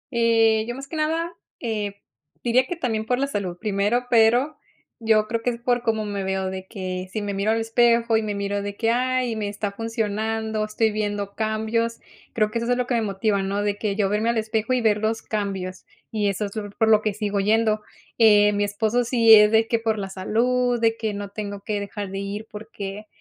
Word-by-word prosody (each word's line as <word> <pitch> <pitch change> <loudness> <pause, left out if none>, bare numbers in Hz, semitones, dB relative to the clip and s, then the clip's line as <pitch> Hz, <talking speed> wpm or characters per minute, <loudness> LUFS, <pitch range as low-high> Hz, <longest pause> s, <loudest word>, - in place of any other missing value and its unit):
Eh, 225 -1 +3
yo 240 - -4
más 275 +1 -8
que 320 - -7
nada, 325 +2 -1 0.3
eh, 210 -4 -3 0.4
diría 250 +2 +3
que 355 - -3
también 225 -8 -1
por 250 - +1
la 275 - +1
salud 195 -9 -3
primero, 210 +4 0
pero 240 +6 +4 0.4
yo 220 -1 +3
creo 230 0 -2
que 245 - 0
es 235 -1 -4
por 245 0 +1
cómo 220 -2 0
me 200 -1 -3
veo 190 0 -1
de 190 0 -7
que 185 -2 -5
si 215 -1 -3
me 200 -1 -3
miro 200 +2 -1
al 225 +1 +2
espejo 230 0 +3
y 220 - +3
me 210 -1 -3
miro 200 0 -2
de 200 0 -5
que: 230 -1 +1
"Ay, 250 -1 0
me 210 -2 -2
está 205 0 -3
funcionando, 220 0 -2
estoy 215 +1 0
viendo 205 -1 -3
cambios". 220 +1 -1 0.3
Creo 215 -1 +1
que 230 - -1
es 235 - -3
eso 245 +1 +2
lo 250 -1 -1
que 250 - -2
me 230 - +2
motiva, 200 0 0
¿no? 200 +1 -1
De 205 0 -1
que 205 -2 -1
yo 205 -2 +1
verme 210 +3 0
al 235 - +1
espejo 220 +3 -1
y 250 - +1
ver 215 -2 +3
los 220 +1 -1
cambios, 195 -3 -4 0.3
y 210 -2 0
eso 200 +2 -2
es 200 - -8
lo 205 -1 -4
por 220 +2 +1
lo 215 -1 +6
que 215 -2 -1
sigo 205 -2 -1
yendo, 215 +1 +2 0.4
eh, 210 -2 +6
mi 205 0 +1
esposo 220 +4 0
sí 230 -2 +6
es 210 -1 +8
de 225 0 +4
que 230 0 +1
por 220 -1 0
la 195 -1 -4
salud 240 +5 +1
de 225 -1 +2
que 220 -3 -3
no 200 -1 -5
tengo 200 -1 -6
que 210 -1 -2
dejar 200 -1 -5
de 195 - -4
ir 200 +2 -5
porque, 210 -1 -7
220 Hz, 230 wpm, -23 LUFS, 205-230 Hz, 0.4 s, es